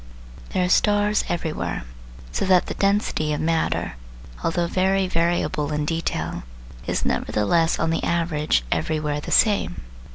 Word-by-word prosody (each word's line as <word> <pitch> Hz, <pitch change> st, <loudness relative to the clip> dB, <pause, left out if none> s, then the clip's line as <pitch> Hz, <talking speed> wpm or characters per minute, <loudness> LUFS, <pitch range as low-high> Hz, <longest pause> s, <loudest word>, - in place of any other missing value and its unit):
There 185 Hz, -1 st, +1 dB
are -, -, -1 dB
stars 205 Hz, +2 st, +3 dB
everywhere, 160 Hz, -, -2 dB, 0.5 s
so -, -, -1 dB
that 185 Hz, -2 st, +4 dB
the -, -, -4 dB
density 195 Hz, -6 st, +1 dB
of 150 Hz, -, -2 dB
matter, 165 Hz, 0 st, 0 dB, 0.5 s
although 170 Hz, +1 st, +1 dB
very 190 Hz, +2 st, +1 dB
variable 165 Hz, -4 st, 0 dB
in 150 Hz, 0 st, -1 dB
detail, 165 Hz, +2 st, -2 dB, 0.5 s
is -, -, -1 dB
nevertheless 165 Hz, +11 st, +1 dB
on 165 Hz, 0 st, 0 dB
the 165 Hz, -, -1 dB
average 160 Hz, -, +1 dB
everywhere 150 Hz, -2 st, -1 dB
the -, -, -7 dB
same. 200 Hz, -, +2 dB
165 Hz, 135 wpm, -23 LUFS, 150-185 Hz, 0.5 s, that